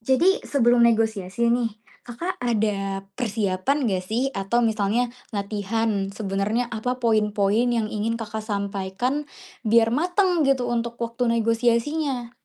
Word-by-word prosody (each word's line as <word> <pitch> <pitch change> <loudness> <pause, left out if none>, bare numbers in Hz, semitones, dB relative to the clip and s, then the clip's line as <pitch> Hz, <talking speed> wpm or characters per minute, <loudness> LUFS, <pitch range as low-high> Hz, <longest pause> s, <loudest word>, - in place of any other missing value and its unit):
Jadi, 265 - +3
sebelum 240 -3 +3
negosiasi, 225 -1 +2
nih, 240 -1 +1 0.4
Kakak 290 +10 -4
ada 205 -5 -1 0.2
persiapan, 225 +3 0
nggak 185 -2 -1
sih? 240 +7 0
Atau, 195 +5 +1
misalnya 225 +1 +1 0.2
latihan. 205 0 -1
Sebenarnya 210 +4 -1
apa 245 +3 -3
poin-poin 215 -1 +2
yang 225 -2 0
ingin 225 +2 -2
Kakak 220 0 -5
sampaikan? 200 +6 -2 0.4
Biar 225 +1 +4
matang, 350 - +2
gitu, 260 -3 +2
untuk 235 0 -2
waktu 235 0 0
negosiasinya. 240 +3 0
230 Hz, 120 wpm, -24 LUFS, 205-245 Hz, 0.4 s, Biar